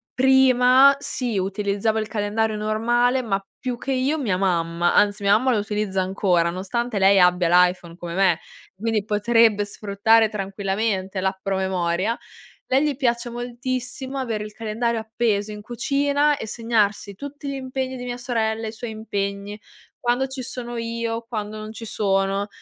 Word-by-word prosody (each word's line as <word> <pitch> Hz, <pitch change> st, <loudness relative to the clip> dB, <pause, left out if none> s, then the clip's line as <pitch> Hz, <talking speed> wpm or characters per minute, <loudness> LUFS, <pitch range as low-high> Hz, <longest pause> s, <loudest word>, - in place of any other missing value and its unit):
prima 265 Hz, +1 st, +6 dB
sì, 250 Hz, -6 st, -3 dB
utilizzavo 200 Hz, +3 st, 0 dB
il 215 Hz, -, -3 dB
calendario 215 Hz, 0 st, -1 dB
normale 240 Hz, +4 st, +1 dB
ma 195 Hz, -4 st, -2 dB
più 250 Hz, -2 st, -3 dB
che 270 Hz, -, -4 dB
io, 265 Hz, +4 st, +1 dB
mia 210 Hz, -10 st, 0 dB
mamma, 175 Hz, -2 st, +1 dB
anzi, 205 Hz, 0 st, +3 dB
mia 200 Hz, +1 st, +5 dB
mamma 255 Hz, +2 st, +1 dB
lo 225 Hz, -, +2 dB
utilizza 205 Hz, -2 st, -1 dB
ancora, 185 Hz, -2 st, +1 dB
nonostante 205 Hz, +6 st, -3 dB
lei 195 Hz, 0 st, +5 dB
abbia 180 Hz, -1 st, +4 dB
l'iPhone 180 Hz, -1 st, +3 dB
come 170 Hz, -1 st, -6 dB
me, 185 Hz, -3 st, +3 dB, 0.3 s
quindi 215 Hz, +1 st, -1 dB
potrebbe 210 Hz, 0 st, +3 dB
sfruttare 215 Hz, +2 st, +2 dB
tranquillamente 195 Hz, -1 st, -2 dB
l'app 190 Hz, 0 st, -1 dB
promemoria, 190 Hz, +2 st, 0 dB, 0.5 s
lei 265 Hz, +3 st, +3 dB
gli 295 Hz, -3 st, 0 dB
piace 240 Hz, -2 st, 0 dB
moltissimo 250 Hz, +2 st, -4 dB
avere 225 Hz, -5 st, -2 dB
il 210 Hz, -, -10 dB
calendario 225 Hz, +1 st, -2 dB
appeso 220 Hz, -2 st, -1 dB
in 210 Hz, 0 st, -8 dB
cucina 285 Hz, +5 st, +1 dB
e 220 Hz, -, -6 dB
segnarsi 210 Hz, -3 st, 0 dB
tutti 285 Hz, +4 st, -8 dB
gli -, -, -3 dB
impegni 260 Hz, 0 st, -4 dB
di 245 Hz, -, -7 dB
mia 245 Hz, 0 st, -4 dB
sorella, 225 Hz, -2 st, -1 dB
i -, -, -4 dB
suoi 225 Hz, 0 st, -7 dB
impegni, 205 Hz, -1 st, -4 dB, 0.4 s
quando 245 Hz, +2 st, +1 dB
ci 265 Hz, 0 st, -6 dB
sono 240 Hz, -1 st, -6 dB
io, 230 Hz, 0 st, -3 dB
quando 215 Hz, -2 st, -4 dB
non 215 Hz, 0 st, -7 dB
ci 225 Hz, -, -8 dB
sono, 195 Hz, -1 st, 0 dB
220 Hz, 155 wpm, -23 LUFS, 200-245 Hz, 0.5 s, prima